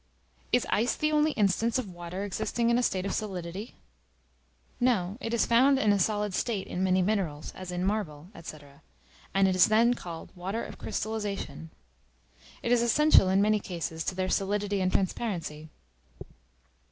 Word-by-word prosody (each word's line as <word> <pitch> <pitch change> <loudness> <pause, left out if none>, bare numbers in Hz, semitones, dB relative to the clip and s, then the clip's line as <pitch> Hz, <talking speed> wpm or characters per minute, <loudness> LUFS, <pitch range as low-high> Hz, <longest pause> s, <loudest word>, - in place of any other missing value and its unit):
Is 245 - +3
ice 230 +4 +2
the 305 0 0
only 300 0 +3
instance 215 +3 +1
of 210 -8 -4
Water 175 +2 -6
existing 230 +4 -1
in 235 - +3
a - - +2
state 190 -6 0
of 195 - -2
solidity? 190 0 -5 1.0
No; 210 -7 +1
it 225 - -3
is 235 - +2
found 260 +4 +5
in 215 -5 +3
a 200 - +1
solid 210 +1 0
state 210 -1 -1
in 185 - -3
many 185 0 +3
minerals, 180 -7 -1
as 185 -1 -7
in 180 +1 -2
marble, 185 -5 -3
&c., 155 -2 -8 0.8
and 195 0 +5
is 185 -1 +5
then 230 +3 +4
called 170 -8 -8
water 190 +6 -3
of - - -10
Crystallization. 205 -6 -4 0.9
It 235 - -1
is 245 -1 +4
essential, 240 -3 +5
in 195 +2 +3
many 215 0 +3
cases, 165 -4 -4
to 185 - -2
their 185 0 -1
solidity 200 0 0
and 185 0 +1
transparency. 175 -6 -2
200 Hz, 165 wpm, -28 LUFS, 185-225 Hz, 1.0 s, found